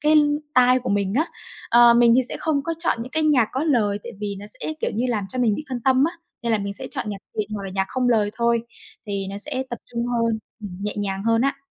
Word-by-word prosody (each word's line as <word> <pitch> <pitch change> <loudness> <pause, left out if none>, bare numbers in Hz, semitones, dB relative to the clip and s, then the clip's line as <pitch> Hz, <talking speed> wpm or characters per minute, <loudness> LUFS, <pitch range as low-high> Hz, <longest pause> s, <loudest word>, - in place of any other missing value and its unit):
cái 305 +1 +3 0.4
tai 255 0 +6
của 250 - -4
mình 200 0 0
á. 310 +5 +2 0.4
Ờ, 235 0 +7
mình 235 0 +6
thì - - +6
sẽ - - -3
không 300 -3 0
có 330 +3 -2
chọn 335 - 0
những 255 - -8
cái 315 - 0
nhạc 280 -8 +4
có 265 - -1
lời 215 -9 +2
tại - - -7
vì 205 -1 -3
nó 205 - -9
sẽ, 270 - -4
kiểu - - 0
như, 235 +4 0
làm 215 -5 -1
cho 255 - -6
mình 235 -4 +3
bị 305 - -5
phân 255 -2 -3
tâm 260 +2 +4
á, - - -15 0.3
nên 235 - 0
là 220 - +3
mình 200 0 -3
sẽ - - -4
chọn - - -3
nhạc 200 -1 -4 0.2
thiền 210 0 -1
hoặc 205 - -4
là 195 - -5
nhạc 195 - +1
không 255 -1 0
lời 215 -4 +3
thôi, 235 -1 +2 0.5
thì 200 -1 -3
nó 200 - -5
sẽ 260 +4 -3
tập 240 - -4
trung 235 0 -2
hơn, 230 -2 0 0.2
ừm, 205 - -6
nhẹ 210 0 -2
nhàng 195 -1 -2
hơn 230 0 +3
á. 275 0 +1
235 Hz, 275 wpm, -23 LUFS, 205-255 Hz, 0.5 s, Ờ